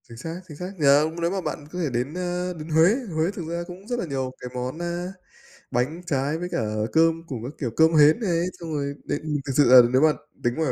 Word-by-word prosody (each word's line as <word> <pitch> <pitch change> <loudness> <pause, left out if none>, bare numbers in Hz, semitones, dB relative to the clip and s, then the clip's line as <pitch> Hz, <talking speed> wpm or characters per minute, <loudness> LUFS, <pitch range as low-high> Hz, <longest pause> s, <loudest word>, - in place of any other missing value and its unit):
Chính 115 -2 -12
xác, 165 +8 -6
chính 150 -4 -10
xác. 180 +3 -5
Giờ 145 0 +5
hông 160 +2 -3
nếu 170 +1 +1
mà 195 0 -2
bạn 150 - -5
có 180 - -5
thể 160 -5 0
đến, 125 +5 -1
ơ, 180 0 -2
đến 160 -1 -9
Huế, 165 +7 +5 0.2
Huế 160 +4 +1
thực 170 -5 -6
ra 170 +1 -3
cũng 185 +3 -11
rất 245 0 -2
là - - -2
nhiều 135 -4 -3
cái 125 - -7
món, 125 +5 -4
a, 175 +2 -3 0.6
bánh 135 +7 -1
trái 145 0 0
với 180 +2 -4
cả - - -1 0.3
cơm 165 0 +3
cùng 125 -7 -5
các 130 +5 -6
kiểu 125 -6 -2
cơm 160 +1 +5
hến 150 +5 +6
này. 175 -6 0
Xong 165 -2 -6
rồi 140 -1 -2
đến 145 - -2
ừm, 155 -1 -2
thực 135 - -2
sự 145 - +6
là 130 -1 +11
nếu 130 - +4
mà 155 -1 +5 0.3
tính 120 - +1
ngoài 160 -5 0
160 Hz, 265 wpm, -24 LUFS, 140-175 Hz, 0.6 s, là